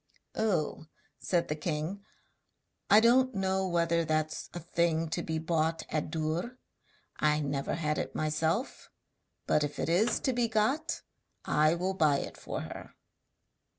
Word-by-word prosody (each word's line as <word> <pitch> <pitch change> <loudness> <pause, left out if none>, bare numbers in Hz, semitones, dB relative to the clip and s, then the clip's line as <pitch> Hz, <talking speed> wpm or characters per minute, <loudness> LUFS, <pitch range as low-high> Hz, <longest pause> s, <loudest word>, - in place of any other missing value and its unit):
'Oh!' 175 -7 -1 0.3
said 175 -2 0
the 150 - -1
king, 160 +5 -3 0.9
'I 210 +2 +8
don't 255 +2 +4
know 190 0 0
whether 170 -1 +2
that's 155 0 -1
a 175 - -6
thing 170 -1 0
to 170 - -1
be 160 -1 -2
bought 160 0 0
at 155 -1 -1
Dûr; 160 +10 -2 0.6
I 150 0 +2
never 140 -2 -2
had 150 -2 -1
it - - -4
myself, 160 - -1 0.6
but 150 - +2
if 145 0 -3
it - - -1
is 205 +8 +3
to 260 - +1
be 240 -1 +1
got 240 +9 0 0.4
I 155 +2 +3
will 185 +2 -1
buy 155 -6 +3
it - - -5
for - - -5
her.' - - -9
170 Hz, 150 wpm, -30 LUFS, 155-195 Hz, 0.9 s, I